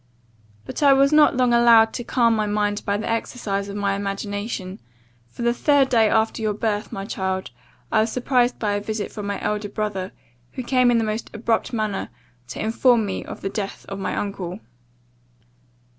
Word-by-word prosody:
But - - -6
I 280 -2 +7
was 275 +2 +4
not 300 -3 +5
long 250 -2 +3
allowed 230 -2 +6
to 240 - -4
calm 235 -1 +2
my 215 -1 0
mind 205 0 0
by 200 0 +1
the 215 - -4
exercise 210 -3 -2
of 200 - -6
my 200 -1 0
imagination; 200 0 -4 0.5
for 180 - -7
the 235 0 +3
third 280 +1 +3
day 225 -3 +4
after 220 +1 +1
your 215 -1 0
birth, 210 -1 -2
my 195 - -5
child, 190 -4 -3 0.4
I - - +3
was 220 +1 0
surprised 250 -1 +1
by 210 -2 -1
a 205 - -1
visit 215 0 -4
from 210 -2 -6
my 200 - -2
elder 210 0 -2
brother; 200 -3 -3 0.4
who 255 - -5
came 250 0 +3
in 240 - +4
the 225 - +1
most 215 +1 -3
abrupt 225 +1 0
manner, 215 -4 -2 0.4
to - - -7
inform 230 +1 +3
me 195 - -4
of - - -9
the 195 - -2
death 200 -1 -5
of 195 - -5
my 195 - -2
uncle. 195 -2 -4
215 Hz, 190 wpm, -22 LUFS, 200-235 Hz, 0.5 s, I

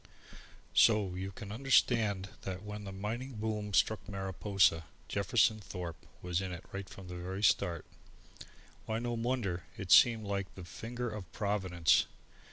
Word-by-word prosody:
So 105 -5 +5
you 95 +1 -4
can 100 +1 -8
understand 115 -5 +2
that 95 0 -5
when 105 0 -6
the 100 - -6
mining 115 +7 -4
boom 105 -1 -3
struck 105 -3 +2
Mariposa, 95 -3 +1 0.2
Jefferson 110 +2 +2
Thorpe 90 -5 -7 0.2
was 90 +1 0
in 95 -1 -4
it 90 0 -7
right 100 -1 -6
from 95 -1 -10
the 90 - -7
very 95 +3 -5
start. 90 -5 +2 1.0
Why, 110 - -1
no 120 +1 -2
wonder; 115 -7 -1
it 95 -3 -5
seemed 115 +2 +7
like 100 -1 -3
the 95 - -8
finger 120 +8 -5
of 105 -6 -6
Providence. 95 -5 +2
100 Hz, 150 wpm, -33 LUFS, 95-110 Hz, 1.0 s, seemed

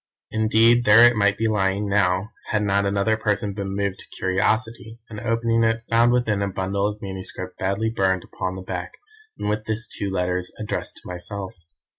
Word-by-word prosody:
Indeed 115 +2 +4
there 105 +3 +8
it 120 0 +7
might 100 -1 +2
be 115 - +1
lying 100 -1 0
now, 100 0 +1 0.2
had 105 -1 0
not 100 0 +1
another 100 +2 +1
person 105 -1 -1
been 100 -1 -4
moved 100 -1 -2
to - - -12
curiosity, 110 +4 -1
and 105 - -6
opening 115 0 +1
it, 115 0 +1
found 115 +1 +5
within 115 -5 +1
a 100 - 0
bundle 100 +1 -1
of 105 0 -6
manuscript 95 -1 -7
badly 100 +4 0
burned 95 -4 +1
upon 95 0 -4
the 95 - -7
back, 90 -1 -5 0.4
and - - -4
with 105 +1 -1
this 110 +2 0
two 100 - -3
letters 90 -1 -1
addressed 110 - -4
to - - -11
myself. 95 +2 -5
100 Hz, 185 wpm, -23 LUFS, 95-110 Hz, 0.4 s, there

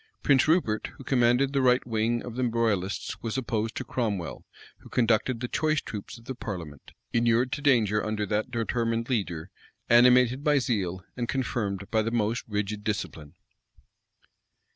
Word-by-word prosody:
Prince 135 -2 +4
Rupert, 155 -10 +2
who - - -10
commanded 125 +1 +2
the 140 - +2
right 125 -1 +3
wing 115 0 0
of 120 -2 -7
the 130 - -1
royalists, 110 -5 -1
was 115 +3 -3
opposed 115 -3 -2
to - - -3
Cromwell,[] 105 -9 -3 0.4
who - - -15
conducted 115 +1 +1
the 125 - -2
choice 155 +3 +1
troops 105 -4 -7
of 115 - -17
the 130 - -4
parliament, 85 - -7 0.2
inured 120 +2 +2
to 145 - -3
danger 110 -7 +3
under 105 -1 -1
that 105 +3 -1
determined 115 0 -1
leader, 90 -9 -2 0.4
animated 125 +2 +5
by 150 -1 +4
zeal, 95 -9 -1
and 120 -1 -3
confirmed 105 -7 -2
by 110 - +3
the 110 - -1
most 115 0 0
rigid 105 -1 -3
discipline. 85 -7 -4
115 Hz, 160 wpm, -27 LUFS, 105-125 Hz, 0.4 s, animated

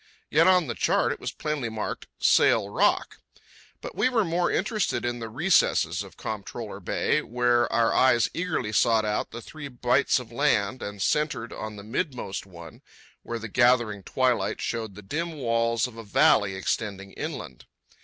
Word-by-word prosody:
Yet 165 +4 +5
on 180 -2 +5
the 120 - -3
chart - - +1
it - - -5
was - - -4
plainly 150 -6 -3
marked, 110 -1 -5
"Sail 100 -3 +4
Rock." 200 - +1 0.6
But - - -7
we 255 - +2
were 230 -5 +2
more 175 +1 +1
interested 210 - -1
in 120 0 -2
the 115 -1 -6
recesses 160 - +2
of - - -11
Comptroller - - -6
Bay, - - 0
where 120 0 +1
our 115 -1 +2
eyes 125 -3 +4
eagerly 160 -11 -2
sought 110 0 +3
out 105 0 -1
the 120 - -8
three 155 -2 -8
bights 125 +1 +2
of 125 -3 -7
land 120 -3 +1
and 100 -1 -4
centred 150 -6 0
on 110 0 -6
the 100 - -9
midmost 115 - -4
one, 85 -4 -12 0.4
where 115 - -5
the 115 0 -6
gathering 120 -2 +2
twilight 125 +4 0
showed 110 -4 -3
the 105 - -11
dim 165 - -3
walls 115 -4 0
of 125 -3 -8
a 115 - -7
valley 100 -1 +3
extending 100 0 -3
inland. - - -7
120 Hz, 170 wpm, -26 LUFS, 110-150 Hz, 0.6 s, Yet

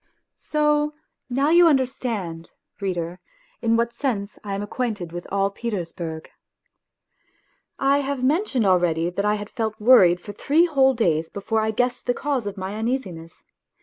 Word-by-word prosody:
So 300 0 0 0.3
now 275 +5 +1
you 345 0 +7
understand, 230 - -1 0.3
reader, 180 -3 -3 0.4
in 230 -1 +2
what 235 0 0
sense 210 -8 -3
I 200 -1 -3
am 200 - -3
acquainted 205 -6 -3
with 175 0 -7
all 195 0 +1
Petersburg. 170 -7 -5 1.5
I 275 +1 +3
have 275 -2 -3
mentioned 280 - +1
already 175 -2 +2
that 200 +3 -2
I 210 0 +2
had 205 -1 -6
felt 220 -3 -3
worried 200 -7 +6
for 205 +3 -9
three 310 - +3
whole 270 -5 +3
days 165 -8 +1
before 220 +2 -2
I 220 - 0
guessed 245 +4 -1
the 245 - +2
cause 275 -7 -2
of 200 0 -5
my 190 +1 -4
uneasiness. 200 -9 -4
220 Hz, 150 wpm, -23 LUFS, 185-265 Hz, 1.5 s, you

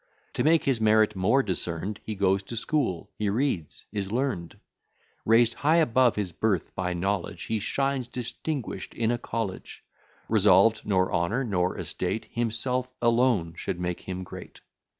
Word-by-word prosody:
To - - 0
make 160 +1 +4
his 130 -5 +1
merit 110 -1 +4
more 110 +9 +3
discern'd, 95 +1 -2
He 110 - -4
goes 95 0 +2
to 110 +4 -8
school 115 - -1
he 105 -1 +1
reads 105 - -2
is 100 -2 -3
learn'd; 120 - -2 0.7
Raised 115 +1 +5
high 150 +6 +2
above 130 -7 +4
his 100 -4 -2
birth, 95 +1 -1
by 90 -1 -2
knowledge, 90 -1 -2
He 110 -1 -1
shines 135 +3 -1
distinguish'd 125 +2 -4
in 115 0 +1
a 120 - -1
college; 115 -5 -5 0.4
Resolved 105 +1 +4
nor 95 -2 +2
honour, 95 +10 +1
nor 90 -6 0
estate, 95 +5 -3
Himself 125 +2 -1
alone 115 -8 +2
should 90 - -4
make 90 -1 -3
him 95 0 -5
great. - - -10
110 Hz, 150 wpm, -27 LUFS, 95-120 Hz, 0.7 s, Raised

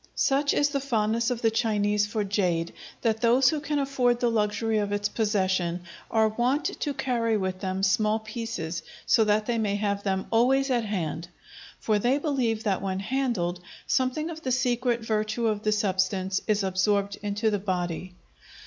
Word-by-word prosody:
Such 280 +1 +2
is 290 - +3
the 280 -1 -1
fondness 230 -3 0
of 240 -2 -3
the 225 - +4
Chinese 210 -2 +1
for 210 0 -1
jade 180 -5 0 0.3
that 220 -2 +1
those 245 +3 +5
who 310 - -1
can 295 0 -2
afford 260 -4 +1
the 240 -1 +2
luxury 215 0 0
of 205 -1 -2
its 205 0 0
possession 185 -5 0 0.3
are 220 -1 +3
wont 245 +7 0
to 290 - -1
carry 230 -4 0
with 185 -2 -2
them 190 0 -3
small 210 +2 +3
pieces, 220 -7 -5 0.2
so 225 - +4
that 210 0 +2
they 235 0 0
may 205 -2 0
have 200 -1 -1
them 190 -1 -1
always 265 +4 +3
at 240 -3 +1
hand; 170 -5 -3 0.5
for 215 -2 +1
they 245 +6 +2
believe 255 -7 -1
that, 200 -3 0
when 190 -1 -2
handled, 205 -7 -1 0.3
something 265 +6 0
of 320 -1 -8
the 260 - -2
secret 245 -1 +1
virtue 220 +1 -1
of 215 -2 0
the 215 - +1
substance 190 -2 0
is 210 -2 +2
absorbed 200 +1 0
into 210 +2 0
the 205 - 0
body. 180 -2 -3
215 Hz, 175 wpm, -26 LUFS, 200-240 Hz, 0.5 s, those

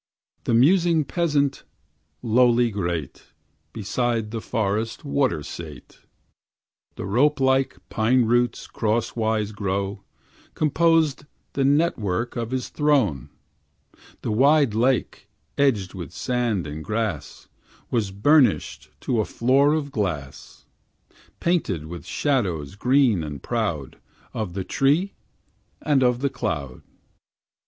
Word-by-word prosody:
The 115 - +2
musing 165 +4 +4
peasant, 145 -3 0 0.6
lowly 120 0 +3
great, 85 -7 -4 0.5
Beside 115 +2 -2
the 115 -1 -4
forest 110 +5 -2
water 135 - 0
sate; 75 -4 -10 1.0
The - - -6
rope 135 +9 +2
like 130 0 +2
pine 120 +2 +2
roots 120 +1 +1
crosswise 110 -1 -1
grown 100 -1 -3 0.6
Composed 155 -2 +2 0.3
the 140 - 0
network 125 - +1
of 115 -2 -3
his 130 0 -3
throne; 130 - +1 0.9
The - - -2
wide 140 +2 +4
lake, 120 +2 0 0.3
edged 115 -10 +1
with 90 -3 -7
sand 120 -7 -1
and 75 +1 -6
grass, 110 -6 -4 0.4
Was 110 -5 0
burnished 110 - +2
to 120 -3 0
a - - -2
floor 135 +5 +3
of 145 -3 -3
glass, 80 - -5 0.7
Painted 130 - 0
with 85 +2 -9
shadows 95 - -1
green 125 - +2
and 75 -3 -7
proud - - -3 0.3
Of 100 -6 -4
the 95 - -2
tree 150 - +1 0.7
and 145 -3 +2
of 125 -1 +2
the 140 - +1
cloud. 70 -6 -4
115 Hz, 110 wpm, -23 LUFS, 100-140 Hz, 1.0 s, musing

